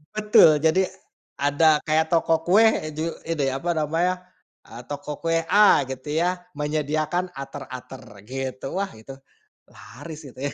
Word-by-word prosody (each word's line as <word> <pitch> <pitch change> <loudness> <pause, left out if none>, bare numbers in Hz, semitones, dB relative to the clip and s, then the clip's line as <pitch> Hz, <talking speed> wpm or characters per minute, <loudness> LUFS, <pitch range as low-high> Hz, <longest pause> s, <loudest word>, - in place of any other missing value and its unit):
Betul 210 -8 +5
jadi, 160 +4 +3 0.6
ada 150 +2 +3
kayak 160 0 +1
toko 165 -1 +2
kue, 195 +5 +5
eee, 155 -9 +2
ju 160 +2 -1 0.2
itu 165 -3 -2
ya 135 - -2
apa 175 - -4
namanya, 165 +4 0 0.6
eee, 115 +2 -9
toko 145 0 -6
kue 165 0 0
A 205 -7 +6
gitu 130 +2 -7
ya, 180 0 -1
menyediakan 155 +3 -1
ater-ater 130 -1 -9 0.3
gitu 130 0 -5
wah 195 0 -2
itu, 110 +5 -11 0.6
laris 160 -2 -11
itu 130 - -15
ya. - - -6
155 Hz, 150 wpm, -24 LUFS, 145-170 Hz, 0.6 s, A